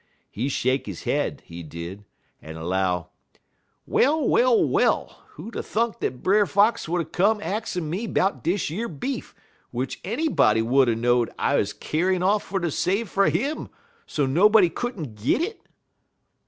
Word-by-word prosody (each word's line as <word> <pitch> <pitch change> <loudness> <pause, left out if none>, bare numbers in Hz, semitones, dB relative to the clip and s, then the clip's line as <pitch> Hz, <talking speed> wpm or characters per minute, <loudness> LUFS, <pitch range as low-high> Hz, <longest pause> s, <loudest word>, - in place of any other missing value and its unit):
He 125 +7 -2
shake 130 -1 0
he 100 - -5
head, - - -2
he 85 +1 -9
did, 85 +5 -8 0.4
en 80 +1 -9
'low: 90 0 -1 0.8
"'Well, 295 0 +2
well, 245 -1 +4
well! - - +1
Who'd 235 - -9
'a' - - -2
thunk 230 +1 -1
dat 125 0 -3
Brer 205 +1 +4
Fox 205 -2 +2
would 175 +1 +1
'a' - - -11
come 200 +7 +1
axin' 205 -5 -3
me 190 +9 -3
'bout 195 -1 0
dish 175 -2 0
yer 220 +8 -3
beef, 235 - -5 0.4
w'ich 125 +2 -3
anybody 200 - +2
would 130 +2 +3
er 115 - +1
know'd 120 +1 +2
I - - +1
'uz - - +1
a - - -14
kyar'n 180 +3 0
off 205 +2 +3
fer 195 0 -3
ter 170 -2 -1
save 195 +9 0
fer 195 0 +2
'im, 285 +7 -1 0.4
so 145 - 0
nobody 185 +6 +5
could 240 -4 -4
n't 115 -10 -7
git 280 - +2
it?' 445 +6 -5
175 Hz, 170 wpm, -24 LUFS, -, 0.8 s, nobody